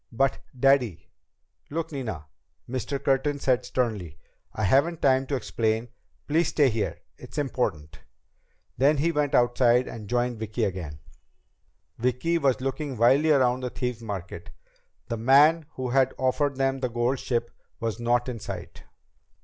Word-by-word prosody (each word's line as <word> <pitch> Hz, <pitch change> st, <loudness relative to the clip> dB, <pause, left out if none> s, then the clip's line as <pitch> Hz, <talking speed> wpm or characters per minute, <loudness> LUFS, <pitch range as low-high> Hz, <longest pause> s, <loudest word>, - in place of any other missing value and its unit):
"But, 135 Hz, +3 st, +1 dB, 0.2 s
Daddy 125 Hz, -11 st, +2 dB, 0.3 s
..." -, -, -47 dB
"Look, 165 Hz, +2 st, -3 dB
Nina," 110 Hz, -, -5 dB, 0.4 s
Mr. 130 Hz, +3 st, -3 dB
Curtin 140 Hz, +2 st, +1 dB
said 130 Hz, -2 st, +1 dB
sternly, 110 Hz, -, -2 dB, 0.3 s
"I 110 Hz, -, -4 dB
haven't 140 Hz, -, +3 dB
time 135 Hz, -1 st, +3 dB
to 140 Hz, -, -1 dB
explain. 115 Hz, -2 st, -1 dB, 0.4 s
Please 160 Hz, +2 st, +2 dB
stay 145 Hz, -3 st, +3 dB
here. 110 Hz, -1 st, -2 dB, 0.2 s
It's -, -, -11 dB
important." 120 Hz, -, -2 dB, 0.8 s
Then 145 Hz, +3 st, +4 dB
he 165 Hz, +4 st, +1 dB
went 150 Hz, -3 st, 0 dB
outside 120 Hz, 0 st, +3 dB
and 105 Hz, -3 st, -8 dB
joined 120 Hz, -1 st, 0 dB
Vicki 110 Hz, +1 st, -3 dB
again. 85 Hz, -7 st, -4 dB, 1.0 s
Vicki 125 Hz, +8 st, +1 dB
was 135 Hz, -4 st, +1 dB
looking 135 Hz, 0 st, -3 dB
wildly 135 Hz, +7 st, +4 dB
around 130 Hz, -4 st, +3 dB
the 125 Hz, -1 st, -3 dB
Thieves' 125 Hz, -2 st, -4 dB
Market. 95 Hz, -6 st, -6 dB, 0.6 s
The 115 Hz, -, -3 dB
man 145 Hz, +7 st, +5 dB
who 130 Hz, -1 st, -3 dB
had 130 Hz, 0 st, +2 dB
offered 135 Hz, +2 st, 0 dB
them 135 Hz, 0 st, 0 dB
the 130 Hz, -1 st, -1 dB
gold 120 Hz, +3 st, 0 dB
ship 120 Hz, -1 st, -2 dB, 0.3 s
was 115 Hz, 0 st, -3 dB
not 120 Hz, +1 st, +1 dB
in 120 Hz, -3 st, -4 dB
sight. -, -, -8 dB
125 Hz, 150 wpm, -26 LUFS, 115-135 Hz, 1.0 s, man